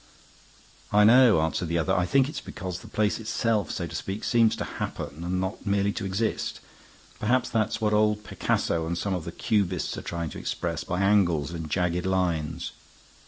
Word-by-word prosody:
"I 105 0 +5
know," 115 -5 +7
answered 80 +2 -1
the 85 +1 0
other. 90 +3 +1
"I 90 -1 +1
think 135 +5 +4
it's 150 -1 -5
because 90 -1 -6
the - - -12
place 105 0 0
itself, 110 -4 0
so - - -3
to - - -8
speak, 100 +3 -4
seems 115 -2 +3
to - - -3 0.2
happen 80 +4 -4
and 90 +1 -1
not 95 +2 -3
merely 100 0 +1
to 110 - -4
exist. 100 +4 -1 0.6
Perhaps 125 +4 +1
that's 110 0 0
what 105 -1 +1
old 105 0 +2
Picasso 80 -5 -1
and 85 +1 -2
some 100 +2 -1
of 90 -3 -3
the 85 - -5
Cubists 95 -2 0
are - - -7
trying 85 -3 -4
to - - -7
express 85 -1 -3
by 90 +2 -2
angles 90 -8 +3
and 80 -2 -5
jagged 90 +1 0
lines. 85 -3 -1
95 Hz, 190 wpm, -27 LUFS, 85-105 Hz, 0.6 s, know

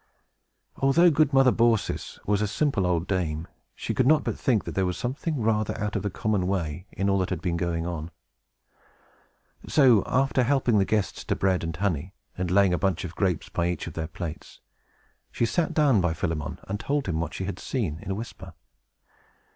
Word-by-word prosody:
Although 165 +6 +5
good 150 -1 +3
Mother 135 -1 +5
Baucis 115 -3 +1
was 105 0 +1
a 105 - +1
simple 105 -4 0
old 85 -2 +1
dame, 85 -5 -2 0.3
she - - -3
could 130 - +2
not 155 +1 +5
but - - -2
think 120 -7 +1
that - - -5
there 95 -1 +1
was 90 -1 -2
something 135 - -3
rather 110 -1 0
out 105 0 -2
of - - 0
the 105 - -2
common 100 -1 -1
way, 90 -1 -2
in 100 - -2
all 100 0 +2
that 95 - -1
had 90 - -2
been 85 +1 -1
going 85 -1 -1
on. 85 -2 -4 1.6
So, 125 -8 +5
after 135 0 +2
helping 125 -4 +2
the 95 - +3
guests 105 -2 -1
to - - 0
bread 95 -2 +1
and 80 -1 -3
honey, 90 -1 -2 0.2
and 90 -2 -2
laying 95 0 +4
a 90 - 0
bunch 95 -3 0
of 85 - -6
grapes 90 -6 -1
by 85 0 0
each 90 - -2
of 85 - -7
their 80 0 -3
plates, 80 -1 -7 0.7
she 120 - 0
sat 160 +7 0
down 140 -10 +3
by 90 -2 0
Philemon, 80 -3 -3
and 100 +1 -3
told 145 +4 -1
him 80 -3 -1
what 85 - -3
she - - -3
had 100 - -5
seen, 95 - -2
in - - -8
a 95 - -1
whisper. 115 +3 -8
95 Hz, 205 wpm, -26 LUFS, 85-120 Hz, 1.6 s, Although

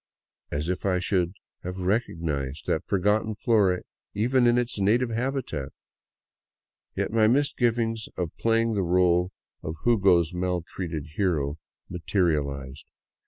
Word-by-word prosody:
As 75 +2 -2
if 90 0 -2
I 95 -2 +2
should 90 -1 0 0.3
have 90 +1 -5
recognized 80 - -2
that - - -1
forgotten 105 +3 +1
flora, 100 -5 +2 0.3
even 120 +4 +3
in 120 0 +4
its 120 -3 -1
native 115 +5 +2
habitat! 115 - -3 1.2
Yet - - -1
my 110 -1 +5
misgivings 120 -4 +1
of 85 -3 -3
playing 115 0 +1
the 100 - 0
role 90 0 +3 0.3
of 80 - -5
Hugo's 95 -7 +4
maltreated 90 -3 -3
hero 80 -6 0 0.3
materialized. 75 -7 -1
95 Hz, 115 wpm, -26 LUFS, 85-115 Hz, 1.2 s, my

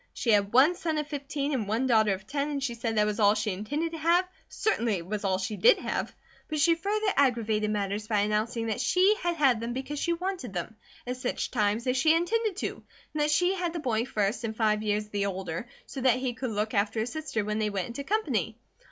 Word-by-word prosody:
She 230 - +1
had 205 -1 +3
one 270 +8 +6
son 335 -3 -2
of 300 - -1
fifteen 285 0 -3
and 225 -7 -1
one 225 +5 0
daughter 220 -4 +4
of 190 +1 -13
ten, 280 +1 -2
and 280 -2 -3
she 250 -3 -1
said 230 -1 -3
that 210 - +4
was 210 +1 -2
all 205 0 +5
she 210 0 -1
intended 290 - -3
to 325 - -6
have, 345 +3 +3 0.2
certainly 235 - 0
it 170 -2 -5
was 210 +3 -4
all 190 -1 +1
she 200 +3 -3
did - - +6
have; - - -3 0.4
but 310 -2 -2
she 335 +3 +5
further 405 +4 0
aggravated 225 -6 +2
matters 205 0 -2
by 210 -2 +2
announcing 215 +3 0
that 220 -2 -2
she 380 +3 +4
had 345 0 0
had 270 -7 +3
them 230 +1 -3
because 270 +3 -4
she 340 - +1
wanted 350 - -4
them; 180 +4 -4 0.3
at 250 +1 -3
such 250 -1 -3
times 215 0 +1
as 255 0 +1
she 315 +4 +4
intended 415 +4 0
to; - - -4 0.3
and 305 - -1
that 295 - +2
she 355 +5 +3
had 355 -3 -2
the 340 - -3
boy 235 -6 0
first 215 -2 -1
and 220 -1 -4
five 215 -2 +2
years 210 0 -1
the 200 -1 -1
older, 190 +2 -4 0.2
so 270 - -7
that 255 -1 +4
he 255 -1 -2
could 255 +2 -4
look 215 0 -2
after 210 +2 +1
his 230 - -3
sister 305 -9 -3
when 210 +1 -1
they 215 -1 +1
went 195 -3 -2
into 240 +4 -6
company. 270 - -1
240 Hz, 240 wpm, -28 LUFS, 210-305 Hz, 0.4 s, one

